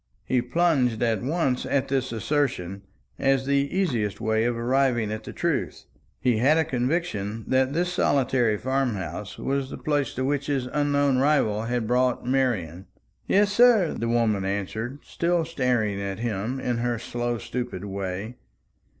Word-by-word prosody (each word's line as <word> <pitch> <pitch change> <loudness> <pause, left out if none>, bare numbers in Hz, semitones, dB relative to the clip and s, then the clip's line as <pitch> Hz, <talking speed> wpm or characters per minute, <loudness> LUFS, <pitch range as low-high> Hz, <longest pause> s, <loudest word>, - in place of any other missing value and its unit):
He 130 -1 +1
plunged 125 -4 +1
at 115 -2 +1
once 135 -1 0
at 140 -2 0
this 130 -2 -1
assertion, 115 - -1 0.4
as 135 -1 +2
the 140 0 +1
easiest 120 - 0
way 110 0 +1
of 120 -1 0
arriving 120 -2 +1
at 110 0 -4
the - - -6
truth. - - -2 0.3
He 125 -3 +2
had 140 +8 +4
a 160 - +2
conviction 120 - -2
that 130 +1 +2
this 175 +2 0
solitary 130 - +2
farm 130 -1 0
house 95 +2 -6
was 135 -1 -2
the - - -6
place 145 -4 -1
to 130 - -1
which 145 0 -1
his 135 -3 0
unknown 145 -1 +1
rival 130 -7 +2
had 120 -1 -1
brought 125 +2 +1
Marian. 105 - -1 0.4
"Yes, 205 0 +3
sir," 230 -6 +5
the 115 - -2
woman 115 -4 +2
answered, 100 +6 -3
still 170 -1 0
staring 125 -10 0
at 100 -1 -3
him 115 +2 -2
in 120 -2 -1
her 120 0 0
slow 120 +1 -3
stupid 120 -5 -5
way. 100 +4 -4
125 Hz, 160 wpm, -25 LUFS, 110-140 Hz, 0.4 s, sir